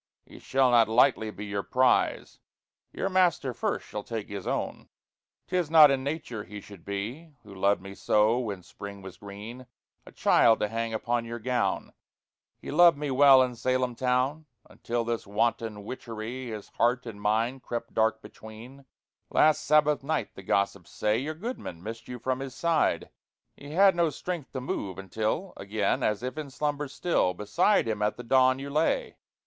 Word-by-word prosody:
He - - -14
shall 130 -1 +2
not 115 -2 +5
lightly 115 -1 +3
be 105 0 -7
your 100 -1 -2
prize 130 +4 +1 0.5
Your - - -2
Master 180 -8 +2
first 120 - -2
shall 105 - -5
take 110 -1 -6
his 100 -2 -6
owne. - - -3 0.6
'Tis 180 -4 -1
not 155 -3 +8
in 135 -1 0
nature 140 -7 -4
he 105 +3 -9
should 100 -4 -14
be 120 +11 -6
(Who 100 -2 -13
loved 100 0 +1
me 100 0 -8
soe 105 +4 +2
when 100 -7 -4
Springe 100 +1 -10
was 95 -1 -10
greene) 105 +6 -9 0.4
A - - -11
childe, 115 -1 +4
to 105 - 0
hange 115 0 -2
upon 120 +1 -1
your 115 +1 -5
gowne! 115 -4 -1 0.6
He - - -8
loved 170 0 +6
me 145 -1 -3
well 135 0 +7
in 125 -1 -2
Salem 130 +1 0
towne 130 +5 0 0.2
Until 120 0 -3
this 115 -2 -3
wanton 105 0 -1
witcherie 120 +1 -6
His 110 -3 -7
heart 125 +2 +1
and 105 -3 -8
myne 115 +5 0
crept 115 -1 -6
dark 110 0 +1
betweene. 110 +6 -12 0.4
Last 155 -1 +3
Sabbath 150 -1 +3
nighte, 155 +2 -2
the - - -10
gossips 100 -1 -1
saye, 105 +1 0
Your 155 +4 -4
goodman 165 - -6
missed 115 +2 -7
you 125 - -6
from 130 +2 -2
his 135 -1 -6
side. 170 -2 +1 0.4
He 145 +1 -10
had 195 +1 +5
no 170 -2 +2
strength 165 +1 -5
to 130 - -4
move, 100 -7 -4
until 110 - -3
Agen, 100 +1 -1
as 105 +2 0
if 130 +4 -4
in 150 -2 -6
slumber 145 +2 -2
still, 140 - 0
Beside 105 - +2
him 110 -2 -2
at 105 0 0
the 120 - -7
dawne 130 +2 +4
you 140 +1 -7
laye. 445 - 0
120 Hz, 175 wpm, -28 LUFS, 105-140 Hz, 0.6 s, not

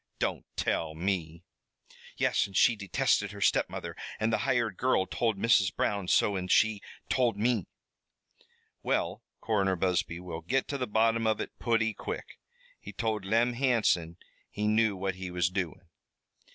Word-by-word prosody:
Don't - - -2
tell 80 -1 -1
me!" 85 -2 -2 0.7
"Yes, 105 - +2
and 95 - -4
she 120 - +5
detested 105 +1 +1
her 100 - -9
step - - +2
mother - - -6 0.2
the 110 0 +1
hired 115 -2 0
girl 125 -5 +2
told 110 +2 -1
Mrs. 95 -3 +3
Brown 100 -3 -1
so, 100 +2 +3
an' 90 -1 -3
she 110 +2 +3 0.3
told 120 -5 +1
me." 115 -2 +1 1.1
"Well, - - -1 0.2
Coroner 100 -4 +1
Busby 90 -1 0
will 85 -2 -6
git 130 +11 0
to 140 - -3
the 125 - -1
bottom 115 +1 +2
of 110 -1 +1
it - - -6
putty 115 -2 +1
quick. - - -7 0.4
He - - -9
told 110 -4 -2
Lem 115 +4 +2
Hansom 115 -10 +1 0.3
he 105 0 -2
knew 110 -1 +3
what 95 0 -2
he 95 0 -6
was 90 0 0
doin'." 90 -2 -3
105 Hz, 155 wpm, -29 LUFS, 90-115 Hz, 1.1 s, she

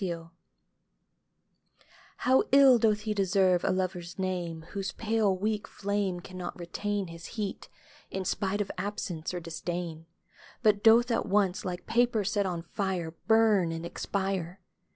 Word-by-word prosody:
SONG. 165 -2 -4 1.9
HOW 260 +1 +4
ill 270 -3 +7
doth 215 -1 +2
lie 215 - 0
deserve 190 -2 +2
a - - +1
Lover's 185 -2 -2
name 175 -4 -3
Whose 195 -2 -3
pale 215 -3 +1
weak 210 +1 -1
flame 200 -3 -2
Cannot 180 0 -7
retain 200 +2 -3
His 165 0 -9
heat, 205 -3 -4 0.4
in 190 -1 -4
spite 200 +2 0
of 200 - -3
absence 185 -5 -3
or 180 - -3
disdain; 165 -1 -5 0.6
But 210 -2 +3
doth 235 +2 +6
at 230 - 0
once, 200 -1 +2
like 180 -1 -5
paper 235 -2 +2
set 200 0 0
on 170 -2 -3
fire, 180 -2 -2 0.2
Burn 215 -6 +4
and 165 +1 -5
expire 190 0 -3
190 Hz, 140 wpm, -29 LUFS, 175-210 Hz, 1.9 s, ill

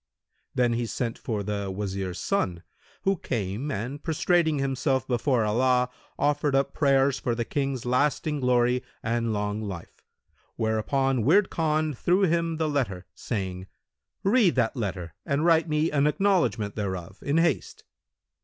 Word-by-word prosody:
Then 120 -2 +2
he 120 0 -1
sent 115 0 -3
for 105 -3 -3
the 100 -1 -3
Wazir's 95 -2 -3
son, 90 - -1 0.4
who 195 0 +2
came 110 - -3
and 125 +6 -4
prostrating 160 -1 +2
himself 135 -1 0
before 125 -1 +1
Allah, 125 +3 +2 0.3
offered 145 -1 +1
up 135 0 +1
prayers 135 -2 +3
for 120 - -1
the 120 0 -2
King's 135 -3 -2
lasting 145 +4 +1
glory 125 -1 +2 0.2
and 115 0 0
long 105 0 -2
life; 95 -5 -8 0.5
whereupon 125 +4 +1
Wird 190 - +4
Khan 155 -1 0
threw 180 +9 +2
him 165 -2 +1
the 160 -1 0
letter, 115 -12 -1
saying, 95 -4 -4 0.6
"Read 200 -3 +4
that 120 0 +1
letter 90 - -4
and 140 +3 0
write 165 -1 +4
me 155 +1 +1
an 145 0 +3
acknowledgment 150 - +1
thereof 95 -3 -4
in 145 +2 0
haste." 165 -4 0
130 Hz, 145 wpm, -26 LUFS, 105-150 Hz, 0.6 s, Wird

